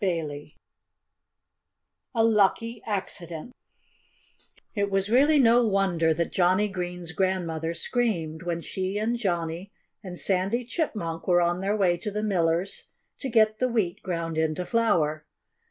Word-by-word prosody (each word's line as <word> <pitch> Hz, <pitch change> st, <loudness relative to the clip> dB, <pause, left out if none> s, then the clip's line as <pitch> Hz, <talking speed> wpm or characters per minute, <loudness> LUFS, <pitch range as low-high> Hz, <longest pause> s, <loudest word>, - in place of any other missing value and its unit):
XIV 150 Hz, -5 st, -3 dB, 1.6 s
A 225 Hz, -, +3 dB
LUCKY 225 Hz, +1 st, +2 dB
ACCIDENT 185 Hz, -1 st, -4 dB, 1.2 s
It 200 Hz, -2 st, 0 dB
was 195 Hz, +1 st, 0 dB
really 290 Hz, +5 st, +5 dB
no 240 Hz, -2 st, +5 dB
wonder 195 Hz, -6 st, +2 dB
that 170 Hz, +1 st, -1 dB
Johnnie 185 Hz, +3 st, +3 dB
Green's 180 Hz, -3 st, -4 dB
grandmother 170 Hz, -3 st, -1 dB
screamed, 170 Hz, -10 st, -1 dB
when 170 Hz, -1 st, -3 dB
she 190 Hz, +3 st, -3 dB
and 220 Hz, +3 st, 0 dB
Johnnie 175 Hz, -3 st, -2 dB, 0.3 s
and 180 Hz, -2 st, -7 dB
Sandy 195 Hz, +7 st, 0 dB
Chipmunk 210 Hz, -, -3 dB
were 175 Hz, -1 st, +5 dB
on 175 Hz, +1 st, +1 dB
their 195 Hz, +2 st, 0 dB
way 180 Hz, -4 st, +3 dB
to 190 Hz, -, -4 dB
the 210 Hz, +1 st, -3 dB
miller's 175 Hz, -2 st, 0 dB, 0.3 s
to 270 Hz, -, -3 dB
get 215 Hz, -2 st, +3 dB
the 255 Hz, -, +2 dB
wheat 215 Hz, -7 st, -1 dB
ground 165 Hz, -3 st, -3 dB
into 160 Hz, +3 st, 0 dB
flour. 165 Hz, -10 st, +1 dB
185 Hz, 135 wpm, -26 LUFS, 170-215 Hz, 1.6 s, really